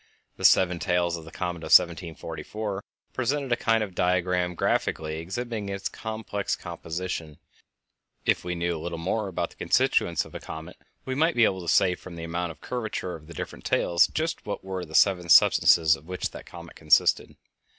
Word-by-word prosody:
The - - -3
seven 90 -2 +5
tails 90 -1 +1
of 80 -1 -9
the 80 - -11
comet 90 +1 -4
of 80 - -8
1744 90 +5 +1 0.3
presented 135 +1 -1
a - - +5
kind 115 -2 +1
of 100 -3 -6
diagram 90 0 +1
graphically 80 -1 -1
exhibiting 105 +4 -4
its 100 -1 -3
complex 110 -2 -4
composition, 85 0 -5
and, 75 - -16 0.9
if - - +2
we 90 0 -3
knew 85 0 -1
a 80 - -6
little 85 0 -4
more 100 +6 -1
about 95 - -3
the - - -19
constituents - - +2
of - - -14
a - - -6
comet, 80 +3 -9 0.3
we 130 - -2
might 160 +5 +2
be 120 -2 +5
able 95 -2 0
to 85 - -1
say 95 -2 +4
from 90 -1 -10
the 85 - -7
amount 85 +1 -3
of 80 - -15
curvature 110 -7 -4
of 75 -1 -10
the 85 - -11
different - - -7
tails 85 0 +3
just 160 +1 -3
what 105 - -5
were 95 -1 -4
the 80 -1 -9
seven 90 -2 +3
substances 80 -1 +6
of 80 +1 -16
which 90 0 -3
that - - -11
comet 85 -1 -11
consisted. 75 -2 +3
90 Hz, 190 wpm, -26 LUFS, 85-100 Hz, 0.9 s, substances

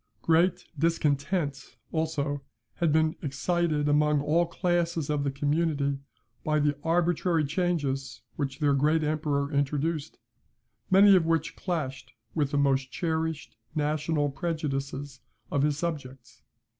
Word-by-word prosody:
Great 175 +2 +3
discontent, 145 -2 0
also, 150 -3 -1 0.4
had 170 -3 +2
been 160 +1 +2
excited 150 +1 0
among 150 0 +3
all 160 +4 +2
classes 170 -3 0
of 145 -1 0
the 140 - +1
community 145 0 0 0.4
by 155 0 +1
the 145 -1 +2
arbitrary 170 -1 +2
changes 145 -4 -1
which 135 -2 -3
their 145 -1 +2
great 155 +3 +2
emperor 150 -1 -1
introduced, 145 +2 -1 0.7
many 195 +1 +7
of 170 -3 +3
which 165 -1 0
clashed 150 -8 -4 0.2
with 150 -4 +1
the 145 - -1
most 135 -2 +2
cherished 160 -2 -2 0.2
national 150 0 0
prejudices 140 -4 -3 0.3
of 140 - +1
his 145 0 +1
subjects. 140 -7 -5
150 Hz, 120 wpm, -28 LUFS, 140-165 Hz, 0.7 s, many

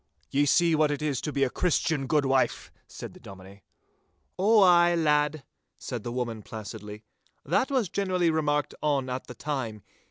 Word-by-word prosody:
'Ye 145 +1 +2
see 170 +3 +4
what 155 -1 +3
it 145 0 -3
is 145 -4 -1
to 150 - -3
be 140 -1 0
a 135 - +2
Christian, 160 -5 0
good 145 +1 +2
wife!' 135 -1 0 0.2
said - - -9
the - - -15
Dominie. 95 +1 -13 0.8
'Ow 210 +3 +5
ay, 175 -1 +5
lad,' 150 -2 +1 0.3
said 125 -3 -6
the 120 - -5
woman, 120 -3 -3
placidly. 105 0 -9 0.4
'That 180 - +1
was 260 -7 +1
generally 185 -2 0
remarked 150 -2 0
on 140 -4 0
at 130 +1 -5
the 125 - -9
time. 120 -9 -4
145 Hz, 170 wpm, -27 LUFS, 125-165 Hz, 0.8 s, Ow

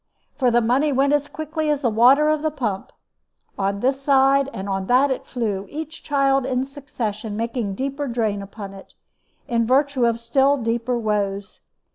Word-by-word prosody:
For 260 -4 +2
the 240 0 +3
money 260 +6 +2
went 275 +2 +2
as 290 0 +1
quickly 310 0 -3
as 295 -2 0
the 245 - +2
water 255 +7 +5
of 305 -1 +1
the 310 - +1
pump; 235 -10 -4 0.6
on 200 0 -2
this 270 +2 0
side 275 0 +3
and 190 -4 -6
on 195 -1 -2
that 265 +3 +4
it 260 - -4
flew, 205 -6 -3
each 315 +2 -7
child 275 -2 +2
in 255 0 -1
succession 240 -7 -5
making 230 -3 -2
deeper 275 +4 -3
drain 220 -4 -1
upon 200 0 -9
it, 195 - -14 0.5
in 230 -1 0
virtue 265 -1 +2
of 230 0 0
still 270 +4 +2
deeper 235 0 -1
woes. 205 -3 -2
250 Hz, 175 wpm, -22 LUFS, 220-280 Hz, 0.6 s, water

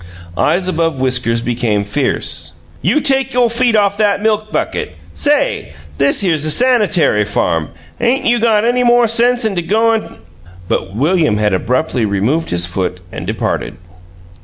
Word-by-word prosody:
Eyes 180 - +1
above 165 -5 -1
whiskers 125 -3 +1
became 115 -4 -1
fierce. 120 +8 -2 0.3
"You 305 - +1
take 270 -2 +1
your 245 -2 +3
feet 235 -1 +1
off 200 -1 +2
that 205 -2 +2
milk 215 0 -1
bucket. - - -3 0.2
Say! 290 -1 0 0.3
This 140 - +3
here's 165 -6 0
a 155 - -2
sanitary 205 - +2
farm. 85 -6 -1 0.3
'Ain't 245 +3 0
you 240 0 +2
got 220 -2 +2
any 245 +1 +2
more 240 0 +4
sense 240 +1 +2
'n 210 -3 -1
to 175 - 0
go 220 +6 +2
an' 220 - -4 0.2
" 90 +1 -21
But 95 +2 -2
William 155 - +1
had 105 -1 +1
abruptly 125 +5 -1
removed 110 +12 -1
his 85 0 +1
foot 90 0 -3
and - - -7
departed. - - -3
175 Hz, 160 wpm, -15 LUFS, -, 0.3 s, more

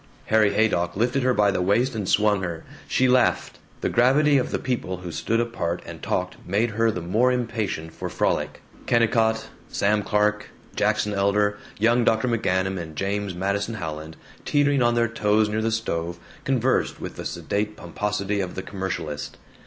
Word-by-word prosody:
Harry 110 -2 +4
Haydock 90 -5 +1
lifted 125 +5 +1
her 130 0 +3
by 105 -4 +3
the 90 - -1
waist 115 +8 +2
and 105 -4 -3
swung 105 -2 +3
her. 85 -3 -4 0.2
She 130 - +2
laughed. 125 -1 +2 0.2
The - - 0
gravity 140 +4 +4
of 125 - -2
the - - -1
people 120 -8 -2
who 90 -1 -7
stood 115 +7 0
apart 100 -8 -2
and - - -9
talked - - -2
made 105 +5 0
her 115 +2 +2
the 90 -6 -3
more 110 +9 +2
impatient 115 -9 -2
for - - -5
frolic. - - -1 0.2
Kennicott, 110 -1 +2 0.2
Sam 105 +1 +1
Clark, 105 +1 +1 0.3
Jackson 105 - +1
Elder, 105 +1 +1 0.2
young 120 +3 +3
Dr. 110 +2 +2
McGanum, 95 -5 0
and 80 -2 -7
James 100 +1 -2
Madison 100 +4 -1
Howland, 80 -4 -6 0.3
teetering 145 -2 +2
on 120 0 +3
their 115 0 +3
toes 110 -2 +2
near 110 +1 -1
the 115 - +1
stove, 85 -6 -2 0.3
conversed 130 -1 +1
with - - -6
the - - -6
sedate 105 +1 -3
pomposity 100 +3 -2
of 90 -2 -3
the 95 - -4
commercialist. 90 -7 -4
105 Hz, 170 wpm, -24 LUFS, 95-115 Hz, 0.3 s, Harry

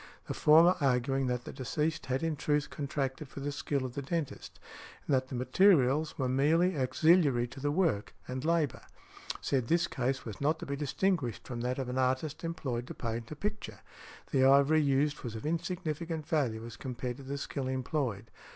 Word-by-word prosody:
The - - -4
former, 165 +4 +6
arguing 135 0 +1
that 125 -1 -1
the - - -7
deceased 150 +5 -2
had 130 +3 -1
in 165 -1 0
truth 150 0 0
contracted 140 0 -3
for - - -8
the 145 +1 -3
skill 140 -1 -2
of 125 - -5
the 140 - -3
dentist, 155 +1 -4 0.5
and - - 0
that 130 0 +2
the 130 - -6
materials 145 +2 +3
were 130 - 0
merely 160 +8 +3
auxiliary 145 -1 +3
to 135 +3 -10
the 145 +2 0
work 155 - 0
and 130 +1 -4
labour, 160 -4 +1 0.6
said 130 -4 0
this 170 +3 +3
case 130 -3 -2
was 110 0 -7
not 155 +3 +2
to - - -7
be 140 - -3
distinguished 145 - -1
from 120 -2 -4
that 125 +1 -1
of 135 -2 -3
an 125 +1 -2
artist 130 +5 0
employed 130 -8 -3
to - - -7
paint 115 -1 -4
a 155 - -6
picture; 210 +6 -5 0.5
the 135 -3 +3
ivory 140 +3 +6
used 145 +1 +1
was 115 -3 -5
of 110 - -6
insignificant 165 -1 -3
value 120 -8 0
as 115 -1 -9
compared 125 -1 -5
to 140 - -10
the 140 +2 -4
skill 140 -1 -4
employed. 130 -5 -2
140 Hz, 190 wpm, -31 LUFS, 130-155 Hz, 0.6 s, former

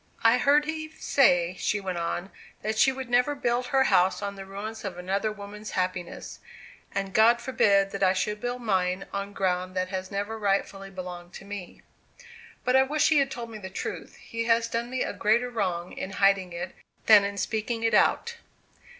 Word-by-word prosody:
"I 230 +2 +5
heard 290 +3 +4
Eve 315 0 -5
say," 180 -10 +3
she 210 - 0
went 185 -3 -3
on, 175 +3 -3 0.3
"that 215 0 -1
she 265 - +6
would 265 -1 -6
never 250 +4 +2
build 245 -2 0
her 270 0 +3
house 185 -6 +3
on 200 0 -3
the 195 -1 -9
ruins 210 +3 -6
of 190 -4 -5
another 195 +4 -1
woman's 210 +1 -9
happiness; 180 -1 -3 0.5
and 195 -1 -3
God 230 +3 +5
forbid 200 -5 +2
that 200 - -5
I 185 -1 +5
should 210 +3 -2
build 245 0 -3
mine 185 -3 0
on 200 0 -3
ground 185 -1 -1
that 185 0 -1
has 185 -1 -4
never 205 +3 -3
rightly 195 -1 -1
belonged 180 -2 -8
to - - -10
me! 200 -3 -8 0.8
But 250 +1 +2
I 265 - +7
wish 290 +3 +2
he 310 -2 +5
had 275 -1 +2
told 235 -3 -6
me 215 - -8
the 190 -2 -7
truth. 190 - -6
He 230 0 -5
has 230 0 +3
done 230 +1 -3
me 255 0 -1
a - - -3
greater 235 +4 +1
wrong 180 -6 -2
in 190 - -6
hiding 195 -2 +3
it, 175 +1 -5 0.3
than 210 -2 +8
in 200 0 -3
speaking 225 +3 -2
it 225 - +2
out." 470 0 +2
205 Hz, 195 wpm, -27 LUFS, 190-235 Hz, 0.8 s, than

